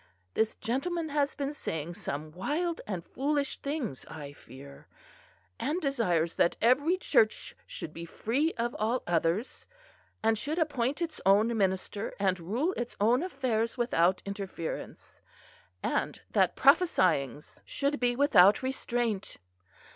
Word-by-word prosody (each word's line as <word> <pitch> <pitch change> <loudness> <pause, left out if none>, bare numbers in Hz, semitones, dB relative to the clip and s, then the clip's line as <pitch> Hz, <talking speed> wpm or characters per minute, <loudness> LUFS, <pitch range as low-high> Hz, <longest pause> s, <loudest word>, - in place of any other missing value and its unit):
This 220 0 +1
gentleman 320 +7 -2
has 285 -1 0
been 285 0 -2
saying 160 - -4
some 155 -1 -5
wild 305 - -2
and 185 -5 -4
foolish 285 +1 -1
things, 280 - -3
I 145 -3 -8
fear; 140 +1 -13 0.7
and 300 +7 -1
desires 215 - +1
that 170 - +3
every 285 +10 +3
church 220 - +2
should 155 - -6
be 170 +1 -7
free 260 - 0
of 235 +1 -2
all 230 +4 0
others; 170 +6 -1 0.6
and 220 -1 +3
should 300 +7 -2
appoint 290 -1 0
its 330 -2 -5
own 210 +5 +4
minister, 195 +1 -1
and 190 -2 +1
rule 235 - -1
its 240 0 -4
own 235 +6 +4
affairs 255 -9 -1
without 185 -7 +2
interference, 200 -4 -6 0.6
and - - -1
that - - +3
prophesyings 170 - +2
should 285 +1 -1
be 245 -1 +2
without 240 -7 +6
restraint. 240 -5 -2
230 Hz, 130 wpm, -30 LUFS, 180-280 Hz, 0.7 s, without